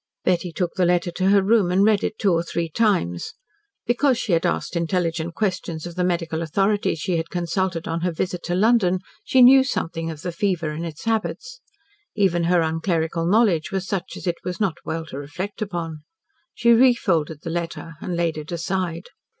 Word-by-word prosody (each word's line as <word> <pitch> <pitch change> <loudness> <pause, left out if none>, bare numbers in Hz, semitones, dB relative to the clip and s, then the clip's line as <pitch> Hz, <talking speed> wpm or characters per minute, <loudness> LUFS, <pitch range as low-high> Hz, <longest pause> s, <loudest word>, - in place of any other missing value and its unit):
Betty 180 -1 +1
took 175 +1 -2
the 185 - +1
letter 175 0 +1
to 185 +2 0
her 200 -1 +5
room, 205 -2 +3
and 185 +2 +3
read 215 -2 +3
it 215 - -2
two 195 -4 +2
or 165 - +2
three 170 0 -3
times. 160 - 0 0.5
Because 255 +1 +2
she 220 - -2
had 165 -1 +3
asked - - -2
intelligent 170 -1 -1
questions 185 -6 -2
of 175 - -6
the 180 +1 -1
medical 165 -2 -1
authority 195 +4 +1
she 170 +2 -1
had 165 0 -3
consulted 175 0 -2
on 165 +1 -2
her 180 +1 0
visit 180 +2 -3
to 175 - -1
London, 190 -3 +3 0.2
she 260 -1 +5
knew 260 +2 +8
something 165 -10 -3
of 155 -1 -8
the 180 - -2
fever 170 -3 -1
and 165 +3 -4
its 160 -2 -9
habits. 430 - -2 0.5
Even 180 -5 +2
her 175 0 +3
unclerical 165 0 -1
knowledge 200 -5 +3
was 190 -1 -2
such 190 -2 -3
as - - -8
it 175 -1 -1
was 180 -1 -4
not 195 -6 0
well 165 0 -4
to 140 -3 -7
reflect 180 +10 -6
upon. 170 -6 -4 0.6
She 235 0 +3
refolded 195 - +3
the 165 - -4
letter 165 -1 -4
and 175 -2 -3
laid 165 -2 0
it 155 +2 -9
aside. 175 0 -2
175 Hz, 195 wpm, -23 LUFS, 165-195 Hz, 0.6 s, knew